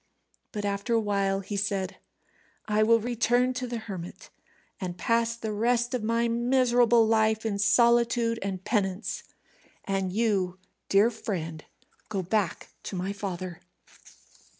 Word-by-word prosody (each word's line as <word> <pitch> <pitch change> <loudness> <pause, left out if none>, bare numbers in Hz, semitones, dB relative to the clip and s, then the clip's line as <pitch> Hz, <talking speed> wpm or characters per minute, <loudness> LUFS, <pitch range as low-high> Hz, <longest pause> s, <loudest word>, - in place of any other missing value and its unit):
But 205 -1 -4
after 200 +4 -1
a - - +4
while 200 -2 0
he 205 +2 -5
said, 195 -1 -2 0.7
"I 215 0 +1
will 230 +1 +5
return 245 +2 +1
to 255 0 -3
the 240 0 -3
hermit, 190 -6 -8 0.5
and 180 -2 -4
pass 230 +3 +1
the 220 -2 -4
rest 240 +3 +1
of 250 - 0
my 230 +2 +1
miserable 240 -1 +3
life 220 0 +2
in 205 -2 -1
solitude 235 +1 +3
and 190 -1 -4
penance. 195 -2 -1 0.6
And 195 -2 -1
you, 195 -4 0 0.3
dear 205 +4 +5
friend, 165 -9 -5 0.5
go 195 -4 -2
back 190 -1 -1
to - - -6
my 185 +2 -2
father." 185 -3 -5
215 Hz, 135 wpm, -27 LUFS, 195-235 Hz, 0.7 s, will